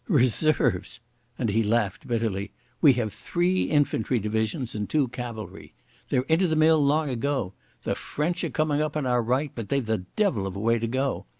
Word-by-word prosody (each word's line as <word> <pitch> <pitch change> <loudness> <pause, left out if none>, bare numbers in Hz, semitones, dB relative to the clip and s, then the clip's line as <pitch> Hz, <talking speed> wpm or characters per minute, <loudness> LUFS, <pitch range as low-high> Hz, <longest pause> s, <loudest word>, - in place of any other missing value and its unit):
"Reserves!" 130 - +2 0.4
and 120 - -1
he 110 +3 +2
laughed 105 -5 0
bitterly. 110 -4 -1 0.3
"We 145 -4 +7
have 115 -5 -2
three 180 +1 0
infantry 135 -5 +1
divisions 110 +4 -2
and 105 -1 -4
two 145 -5 +1
cavalry. 115 -3 -7 0.3
They're 125 - +2
into 165 +6 +2
the 160 - 0
mill 155 -1 +5
long 145 0 +2
ago. 125 -5 -1 0.3
The - - 0
French 165 +4 -2
are - - -1
coming 155 -1 0
up 155 0 -1
on 150 - -1
our 125 -1 +2
right, 130 +5 0
but 115 -3 -6
they've 140 -3 0
the 110 0 0 0.2
devil 160 - +1
of 95 - -6
a - - -4
way 115 +2 +2
to 115 - -2
go. 130 +3 -2
125 Hz, 190 wpm, -26 LUFS, 110-150 Hz, 0.4 s, We